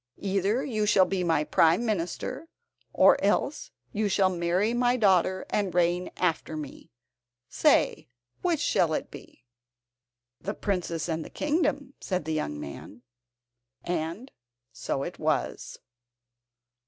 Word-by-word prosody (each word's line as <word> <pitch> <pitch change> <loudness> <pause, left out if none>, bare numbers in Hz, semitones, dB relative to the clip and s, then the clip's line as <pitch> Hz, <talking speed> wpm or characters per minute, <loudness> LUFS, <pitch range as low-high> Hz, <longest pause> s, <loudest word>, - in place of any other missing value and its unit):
Either 200 +5 0
you 215 -5 -1
shall 190 -2 +5
be 190 -1 -1
my 165 -3 +2
Prime 165 +8 +3
Minister, 210 - -3 0.4
or - - +5
else - - 0 0.2
you 210 0 0
shall 190 -1 +3
marry 175 +6 +1
my 245 +1 +2
daughter 185 -3 +2
and 195 -4 -1
reign 175 +1 +1
after 160 -3 -1
me. 150 -3 -8 0.6
Say, - - +2 0.3
which 345 -4 +1
shall - - +2
it - - -4
be?" 120 - -13 1.0
"The 205 +2 -4
princess 175 -5 -2
and 160 -1 -2
the - - -10
kingdom," 295 -3 -1
said 185 -5 -2
the 160 - -2
young 75 - -2
man. 105 +11 -9 0.8
And 175 +9 -3 0.4
so - - -3
it - - -7
was. - - -2
185 Hz, 130 wpm, -27 LUFS, 165-215 Hz, 1.0 s, shall